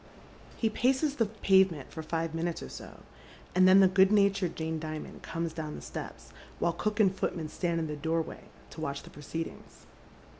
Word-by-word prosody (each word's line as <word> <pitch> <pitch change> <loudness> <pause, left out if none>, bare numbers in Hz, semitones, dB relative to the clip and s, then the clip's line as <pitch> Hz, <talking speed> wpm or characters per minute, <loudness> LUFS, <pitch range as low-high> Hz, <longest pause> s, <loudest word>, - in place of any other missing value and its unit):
He 225 - +1
paces 265 +6 +1
the 230 - +2
pavement 190 -8 +2
for 160 - -6
five 165 0 -2
minutes 165 +1 -2
or 65 - -8
so, 65 - -10 0.5
and 185 +1 +6
then 190 +1 +8
the 190 - +7
good 190 +1 +5
natured 200 -4 +3
Jane 160 0 -2
Dimond 155 0 -6
comes 165 -1 -3
down 155 -2 -5
the - - -8
steps, - - -8 0.2
while 170 - +1
cook 210 +5 -2
and 195 -3 +4
footman 165 -4 -2
stand 170 0 -1
in 160 - -1
the 150 -1 -4
doorway 160 +2 -2 0.3
to 160 - -8
watch 140 -3 -3
the - - -13
proceedings. 160 +3 -7
170 Hz, 185 wpm, -30 LUFS, 160-195 Hz, 0.5 s, then